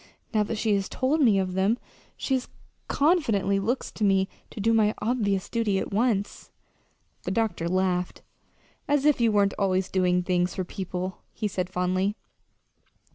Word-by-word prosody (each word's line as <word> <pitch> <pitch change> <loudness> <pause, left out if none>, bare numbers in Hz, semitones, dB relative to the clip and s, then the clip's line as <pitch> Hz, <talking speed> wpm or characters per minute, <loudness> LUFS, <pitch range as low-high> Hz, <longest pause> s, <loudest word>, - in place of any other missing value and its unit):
Now 215 - +3
that 215 +2 -2
she 215 0 +1
has 195 -1 0
told 280 +5 +1
me 225 -7 +5
of 185 -1 -1
them, 195 +5 +2 0.4
she 265 -2 0 0.5
confidently 230 - +2
looks 235 +7 -2
to 220 - -4
me 195 -1 +3 0.2
to - - -9
do 225 +3 +2
my 215 -1 +3
obvious 205 -5 0
duty 225 -4 0
at - - -3
once." 215 -2 0 0.7
The - - -4
doctor 190 -5 -1
laughed. 180 -1 0 0.6
"As 290 -1 +2
if 295 -5 +4
you 230 -1 +4
weren't 200 -1 +3
always 190 -1 +1
doing 180 -1 +2
things 180 0 0
for 185 - -1
people," 185 0 -5
he 215 - -2
said 185 -2 -3
fondly. 185 +2 0
200 Hz, 160 wpm, -26 LUFS, 185-225 Hz, 0.7 s, me